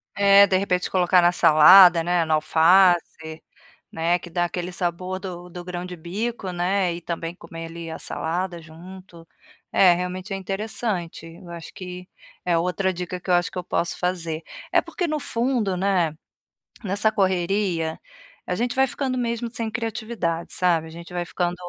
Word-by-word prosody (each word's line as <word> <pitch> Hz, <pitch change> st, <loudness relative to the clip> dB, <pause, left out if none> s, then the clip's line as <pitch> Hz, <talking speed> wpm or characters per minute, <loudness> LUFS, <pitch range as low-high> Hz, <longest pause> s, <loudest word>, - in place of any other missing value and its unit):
É, 200 Hz, 0 st, +6 dB
de 185 Hz, -, +2 dB
repente, 180 Hz, -2 st, -1 dB
colocar 180 Hz, -1 st, +3 dB
na 175 Hz, 0 st, +4 dB
salada, 175 Hz, +2 st, +7 dB
né, 175 Hz, 0 st, +1 dB
no 160 Hz, -, 0 dB
alface, 160 Hz, -1 st, +3 dB, 0.5 s
né 170 Hz, +2 st, 0 dB
que 175 Hz, -, -11 dB
dá 175 Hz, +1 st, 0 dB
aquele 175 Hz, +1 st, -4 dB
sabor 180 Hz, +1 st, -3 dB
do 180 Hz, -2 st, -8 dB
do 175 Hz, 0 st, -9 dB
grão 180 Hz, 0 st, -5 dB
de 180 Hz, -1 st, -8 dB
bico, 195 Hz, +5 st, -4 dB
né, 180 Hz, 0 st, 0 dB
e 170 Hz, -, -7 dB
também 170 Hz, 0 st, -5 dB
comer 165 Hz, -2 st, -9 dB
ali 165 Hz, 0 st, -8 dB
a 160 Hz, -, -6 dB
salada 175 Hz, +1 st, -3 dB
junto, 170 Hz, +1 st, -13 dB, 0.5 s
é, 180 Hz, -2 st, +6 dB
realmente 180 Hz, +3 st, -5 dB
é -, -, -2 dB
interessante, 195 Hz, -3 st, -4 dB
eu 170 Hz, +1 st, -13 dB
acho 170 Hz, -1 st, -9 dB
que 180 Hz, -1 st, -9 dB, 0.4 s
é 175 Hz, -2 st, +1 dB
outra 180 Hz, +2 st, 0 dB
dica 180 Hz, 0 st, -5 dB
que 180 Hz, -, -7 dB
eu -, -, +5 dB
acho 175 Hz, +3 st, +1 dB
que 185 Hz, -, -7 dB
eu 180 Hz, -, -4 dB
posso 170 Hz, -, -2 dB
fazer. 170 Hz, -3 st, -2 dB, 0.3 s
É -, -, +5 dB
porque 355 Hz, -, -3 dB
no 305 Hz, -1 st, -1 dB
fundo, 235 Hz, -6 st, -1 dB
né, 180 Hz, -4 st, +1 dB, 0.7 s
nessa 205 Hz, +2 st, +1 dB
correria, 185 Hz, -4 st, 0 dB, 0.5 s
a 180 Hz, -, 0 dB
gente 240 Hz, +3 st, -2 dB
vai 265 Hz, 0 st, +3 dB
ficando 260 Hz, -1 st, -3 dB
mesmo 235 Hz, -1 st, -2 dB
sem 230 Hz, -2 st, -3 dB
criatividade, 220 Hz, -7 st, -3 dB
sabe. 170 Hz, -3 st, +1 dB
A -, -, -10 dB
gente 170 Hz, +2 st, -11 dB
vai 175 Hz, -1 st, -2 dB
ficando 175 Hz, 0 st, -2 dB
180 Hz, 175 wpm, -23 LUFS, 170-195 Hz, 0.7 s, salada